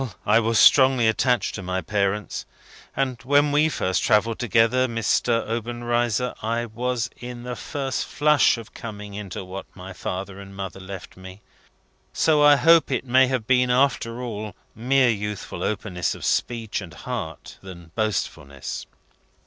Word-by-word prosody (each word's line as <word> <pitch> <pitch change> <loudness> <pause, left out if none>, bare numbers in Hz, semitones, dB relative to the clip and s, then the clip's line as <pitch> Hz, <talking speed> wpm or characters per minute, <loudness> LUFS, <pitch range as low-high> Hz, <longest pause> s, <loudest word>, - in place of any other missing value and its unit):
I 105 +2 +5
was 115 0 +1
strongly 130 -3 +6
attached 120 +2 +1
to 100 - -5
my 95 0 -2
parents, 100 +3 -2 0.5
and 130 -4 -1
when 145 +3 +3
we 150 +2 +3
first 95 - -1
travelled 110 +2 +2
together, 120 +2 +3
Mr. 115 0 0
Obenreizer, 120 +1 -1
I 115 +2 -1
was 120 +1 -2
in 125 0 -8
the 125 0 -5
first 135 -1 -3
flush 150 -4 +3
of 115 -1 -11
coming 105 -3 -8
into 100 -2 -6
what 95 +1 -7
my 95 0 -9
father 95 +2 -5
and 100 0 -11
mother 95 -1 -6
left 95 -1 -9
me. 95 +2 -11 0.7
So 155 -2 +3
I 145 0 +8
hope 165 +2 +5
it 130 -1 -1
may 130 +1 +4
have 125 -4 -2
been, 125 0 +3
after 125 -2 +1
all, 110 -3 -5 0.2
more 130 +3 +2
youthful 105 -3 -3
openness 95 -4 -2
of - - -7
speech 115 -3 -1
and 85 -5 -10
heart - - -6
than 85 -3 -11
boastfulness." 80 - -3
115 Hz, 150 wpm, -24 LUFS, 100-125 Hz, 0.7 s, I